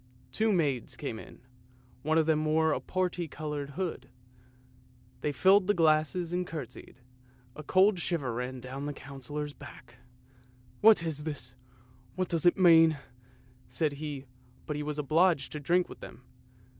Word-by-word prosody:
" - - -29
Two 220 0 +1
maids 140 - 0
came 120 -6 -5
in, - - -13 0.6
one 155 +3 +1
of 160 - +3
them 155 -1 +2
wore 155 0 +2
a - - -1
parti 180 -2 -2
coloured 145 -2 -6
hood. 175 -8 -3
1 - - -28 1.1
They 150 - 0
filled 190 +6 +4
the 205 - +3
glasses 160 +2 +2
and 180 0 -1
curtsied: 140 -8 -8 0.6
a 155 - -7
cold 190 +5 +3
shiver 155 -8 -2
ran 125 +2 -4
down 130 +3 -6
the 145 - -3
Councillor's 145 +2 -7
back. 130 -4 -13 0.4
" 125 0 -29
What 215 -5 +7
is 155 -3 -3
this? 145 -5 -5 0.6
What 185 -1 -2
does 165 0 +2
it 175 - +4
mean? 165 -4 +6 0.4
" - - -30 0.3
said 155 -3 -1
he, 145 -3 -5 0.4
but 150 - -3
he 150 - -3
was 150 0 -4
obliged 155 0 +2
to 150 - -5
drink 175 +5 +1
with - - -11
them. - - -11
155 Hz, 170 wpm, -29 LUFS, 140-175 Hz, 1.1 s, What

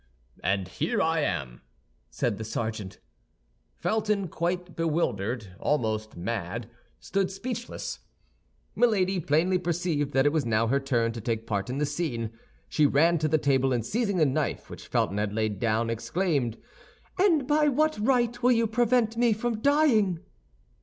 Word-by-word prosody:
"And 95 +1 0
here 210 - -1
I 165 -2 +2
am," 70 - -2 0.5
said 115 -4 -2
the - - -3
sergeant. 110 -3 -4 0.8
Felton, 210 -3 0
quite 175 +2 -2
bewildered, 120 - -1
almost 110 -8 -1
mad, 105 +3 -3 0.3
stood 195 -1 -1
speechless. 240 +4 -5 0.8
Milady 195 -6 +2
plainly 170 +4 +2
perceived 170 -4 -1
that 135 +1 +3
it 145 - +4
was 155 -3 +1
now 115 -1 +1
her 135 +4 +2
turn 120 -4 0
to 115 0 -7
take 115 0 -2
part 100 +1 -2
in 130 - -3
the 150 - +1
scene. 140 -7 -3 0.4
She 150 -2 +3
ran 165 +4 +3
to 155 - +1
the 155 +1 +3
table, 135 -2 +2
and 115 -3 -1
seizing 210 - 0
the 160 - +4
knife 135 - -2
which - - -9
Felton 100 - 0
had 105 -1 -1
laid 110 -2 -1
down, 115 +1 +1
exclaimed, 135 - -1 0.6
"And 335 -8 +4
by 300 0 +3
what 310 0 +2
right 240 +1 +1
will 250 +1 +5
you 230 -1 +2
prevent 230 0 +2
me 235 -1 +4
from 230 +1 -2
dying?" 255 - +3
155 Hz, 155 wpm, -27 LUFS, -, 0.8 s, will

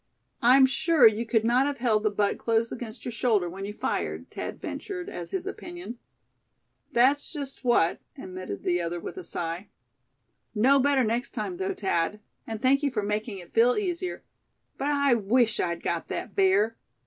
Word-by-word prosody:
"I'm 260 +3 +7
sure 315 +1 +4
you 220 +1 +4
could 225 -2 +2
not 250 +4 +3
have 285 -1 -2
held 230 -3 +2
the 215 - +2
butt 205 0 0
close 230 0 +1
against 230 -3 -6
your 245 - -3
shoulder 220 -6 +1
when 190 +3 -6
you 205 - -5
fired," - - -3
Thad - - -5
ventured, 385 -2 -5
as - - -6
his 380 -2 -3
opinion. 350 -10 -7 0.9
"That's 270 +5 +3
just 280 -4 -6
what," 240 -9 +3 0.2
admitted 185 - -7
the 175 0 +1
other, 170 +1 -3
with 170 - -8
a 370 - -6
sigh. 170 - -4 0.9
"Know 265 +6 +5
better 275 -1 +3
next 235 +4 -2
time, 360 - -3
though, 380 +1 -2
Thad; 190 - 0 0.3
and 225 -1 -4
thank 270 +4 +3
you 290 - +1
for 220 -6 -2
making 210 +1 -2
it 175 -2 -12
feel 235 +2 +5
easier. 365 -3 -3 0.5
But 280 - -2
I 280 -2 +3
wish 225 +1 +2
I'd 170 -1 -1
got 170 -1 -2
that 220 - -5
bear. 200 +4 +3
235 Hz, 180 wpm, -27 LUFS, 205-275 Hz, 0.9 s, I'm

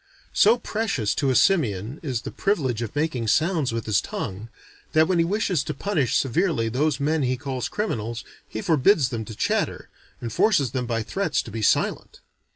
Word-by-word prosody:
So 225 +4 +5
precious 205 - -1
to 140 0 0
a 130 - +2
simian 125 - +2
is 130 -7 -3
the - - -6
privilege 135 - 0
of 115 +1 -5
making 145 -6 -1
sounds 155 - +2
with 115 0 -3
his 100 -3 +2
tongue, 100 +4 -5 0.4
that 160 0 +5
when 180 -2 +1
he - - +5
wishes 185 -4 0
to 150 - -4
punish 150 - 0
severely 135 -4 +1
those 140 +4 0
men 155 +2 +1
he 130 -1 0
calls 130 -1 -4
criminals, 120 - -3 0.2
he 110 - -6
forbids 155 - +3
them 115 -3 -4
to 110 - -8
chatter, - - -1 0.3
and 115 -3 -5
forces 150 - +3
them 125 -2 -2
by 115 -1 -1
threats 170 - -1
to 115 - -10
be 110 +1 -4
silent. 105 - 0
135 Hz, 185 wpm, -24 LUFS, 115-165 Hz, 0.4 s, So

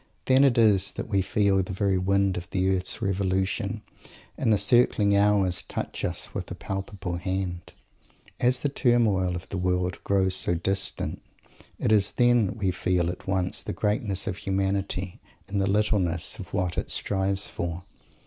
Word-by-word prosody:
Then 130 +1 +5
it 135 -4 +4
is 100 -4 +3
that - - -6
we 100 -2 +2
feel 100 0 +2
the 95 +1 -5
very 95 0 +1
wind 100 0 +1
of 90 -1 -6
the 95 0 +1
earth's 90 0 -2
revolution, 100 +2 -1 0.5
and 115 - 0
the 105 - +4
circling 105 -2 +3
hours 100 -4 +3
touch - - -5
us - - -3
with - - -5
a - - -5
palpable 95 -2 -5
hand. 90 -1 -4 0.7
And 125 - +4
the 130 +3 +1
turmoil 110 -9 +2
of 90 - -7
the 95 - -3
world 90 0 -1
grown 95 -1 +2
so 90 -1 +1
distant, 95 +4 -2 0.6
it - - 0
is 105 -2 +4
then 120 -3 +4
that 100 - -6
we 95 -4 0
feel 90 -1 0
at 90 - -11
once 95 -2 0
the - - -5
greatness 105 -2 0
of 90 - -3
humanity 95 -1 -2 0.3
and 100 0 -1
the 95 - +1
littleness 100 -2 +1
of 90 - -9
what 90 -3 -1
it - - -5
strives 95 0 -1
for. 85 +1 -5
95 Hz, 170 wpm, -26 LUFS, 90-105 Hz, 0.7 s, Then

